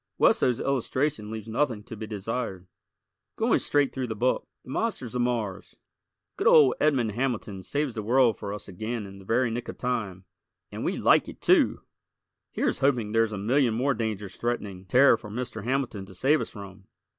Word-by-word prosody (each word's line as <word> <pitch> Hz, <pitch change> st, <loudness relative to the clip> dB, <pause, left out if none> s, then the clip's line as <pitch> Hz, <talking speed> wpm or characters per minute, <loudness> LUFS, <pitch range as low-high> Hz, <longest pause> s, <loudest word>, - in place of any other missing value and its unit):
Wesso's 125 Hz, -2 st, +3 dB
illustration 135 Hz, -3 st, -1 dB
leaves 110 Hz, -1 st, -6 dB
nothing 115 Hz, -2 st, -1 dB
to 115 Hz, -, -9 dB
be 110 Hz, 0 st, -7 dB
desired. 105 Hz, -2 st, -4 dB, 0.7 s
Going -, -, +2 dB
straight 145 Hz, -2 st, +1 dB
through 130 Hz, -2 st, -3 dB
the 110 Hz, -, -4 dB
book: 125 Hz, +4 st, 0 dB, 0.2 s
"The 125 Hz, -, -10 dB
Monsters 135 Hz, -, -2 dB
of 125 Hz, -, 0 dB
Mars." 115 Hz, -6 st, -2 dB, 0.6 s
Good -, -, +1 dB
old 140 Hz, -5 st, +7 dB
Edmond 135 Hz, -7 st, +2 dB
Hamilton 110 Hz, -5 st, -2 dB
saves 145 Hz, +6 st, -2 dB
the 110 Hz, -, -4 dB
world 120 Hz, +1 st, +3 dB
for 100 Hz, -2 st, -5 dB
us 105 Hz, -, -7 dB
again 110 Hz, +4 st, -4 dB
in 100 Hz, 0 st, -11 dB
the 95 Hz, -, -14 dB
very 115 Hz, +3 st, +1 dB
nick 120 Hz, +1 st, -4 dB
of -, -, -7 dB
time 105 Hz, -7 st, -3 dB, 0.5 s
and -, -, -5 dB
we -, -, -1 dB
like -, -, +4 dB
it, -, -, -11 dB
too! -, -, +3 dB, 0.7 s
Here's -, -, -1 dB
hoping 125 Hz, -6 st, +1 dB
there's 115 Hz, 0 st, +2 dB
a 105 Hz, -, -4 dB
million 120 Hz, +3 st, +2 dB
more 135 Hz, +4 st, +1 dB
dangers 105 Hz, -4 st, -4 dB
threatening 105 Hz, -6 st, -3 dB
Terra 125 Hz, +2 st, +5 dB
for 105 Hz, -, -10 dB
Mr. 110 Hz, -1 st, -5 dB
Hamilton 125 Hz, -7 st, -2 dB
to 95 Hz, -, -13 dB
save 140 Hz, -, +3 dB
us -, -, -4 dB
from! 100 Hz, -2 st, -11 dB
115 Hz, 185 wpm, -27 LUFS, 105-130 Hz, 0.7 s, old